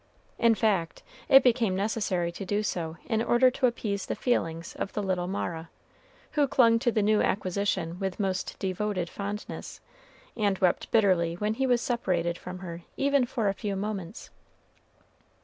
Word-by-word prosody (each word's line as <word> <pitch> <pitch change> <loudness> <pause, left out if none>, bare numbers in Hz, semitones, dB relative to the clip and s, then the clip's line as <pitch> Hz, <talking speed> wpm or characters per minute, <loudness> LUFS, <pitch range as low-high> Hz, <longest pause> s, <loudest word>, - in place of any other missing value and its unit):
In 230 -1 +5
fact, 195 -7 0 0.3
it 270 0 +8
became 230 -6 +2
necessary 195 -4 -1
to 175 - -7
do 205 +3 -1
so 165 -5 -3
in 225 -2 0
order 240 +2 +4
to 255 - +2
appease 210 -4 -3
the - - -2
feelings 165 -9 -1
of 200 - -4
the 210 - -2
little 185 -2 -1
Mara, 170 -3 -4 0.6
who 290 -2 +2
clung 230 -3 +4
to 240 0 +1
the 215 -2 +1
new 210 +1 +3
acquisition 185 -3 -1
with 190 -1 -3
most 190 -2 -2
devoted 190 -2 -2
fondness, 205 +1 -6 0.6
and 205 -3 +1
wept 180 -2 +1
bitterly 185 -6 +3
when 210 +4 -1
he 265 +4 0
was 245 -2 +3
separated 180 -9 0
from 180 +1 -8
her 170 0 -7 0.2
even 280 -2 +2
for 235 -4 -1
a 195 - +2
few 200 0 -3
moments. 195 -1 -5
200 Hz, 165 wpm, -28 LUFS, 180-230 Hz, 0.6 s, it